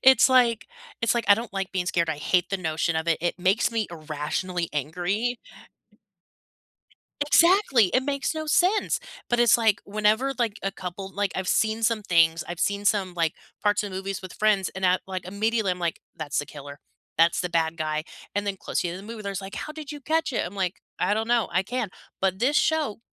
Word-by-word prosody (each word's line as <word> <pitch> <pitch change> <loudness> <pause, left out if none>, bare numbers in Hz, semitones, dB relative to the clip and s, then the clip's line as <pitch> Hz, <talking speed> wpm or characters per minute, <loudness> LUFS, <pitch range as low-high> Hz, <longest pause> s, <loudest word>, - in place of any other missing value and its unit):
It's 265 -1 +7
like 245 -3 +3 0.4
it's 230 - +3
like 235 - 0
I 200 - +9
don't 225 0 -6
like 195 -1 -3
being 185 -2 -1
scared. 170 -3 +1
I 155 - -2
hate 175 +5 +1
the 195 - +1
notion 160 -1 -1
of 160 +1 -2
it, 165 - +2
it 175 +1 -1
makes 190 +7 +2
me 225 -2 0
irrationally 165 +3 -3
angry. 180 - -1 1.8
Exactly! 315 - +5
It 255 +9 +1
makes 280 +2 -1
no 315 0 -4
sense! 380 +9 +2 0.3
But 240 0 +2
it's 240 -1 +6
like 220 -3 +3
whenever, 215 +6 +1
like, 225 -3 0
a 195 - 0
couple 190 +1 -7
like, 200 -1 -1
I've 190 -1 -3
seen 220 +1 +1
some 225 -1 +2
things, 165 -4 +3
I've 175 0 -5
seen 200 +1 0
some, 195 -4 +1
like, 165 -2 0 0.3
parts 205 0 +2
of 205 - -5
movies 190 +1 -4
with 185 - -8
friends 210 -3 +2
and 190 0 -3
at, 185 0 +3
like 185 -2 -5
immediately, 210 +1 0
I'm 180 - -6
like, 170 -1 -2 0.2
"That's 150 -2 -3
the 145 - -1
killer. 145 -1 -10 0.4
That's 165 +1 +4
the 180 - -2
bad 165 -1 +1
guy," 155 -1 -2 0.3
and 205 0 -1
then 200 -1 -1
close - - -4
to - - -1
the - - -2
end 180 - -7
of 200 - -12
the 230 - -6
movie, 220 - -8
there's 200 -1 -3
like, 195 0 -8
"How 305 - -5
did 310 -1 -8
you 295 - -7
catch 315 +1 0
it?" 235 - 0
I'm 180 - -8
like, 190 -2 -1 0.3
"I - - +2
don't 220 +1 0
know. 240 -1 +2
I 180 - +2
can," 235 +1 -2 0.3
but 190 -1 +1
this 265 +7 +2
show 310 -9 +1
200 Hz, 220 wpm, -25 LUFS, 175-230 Hz, 1.8 s, I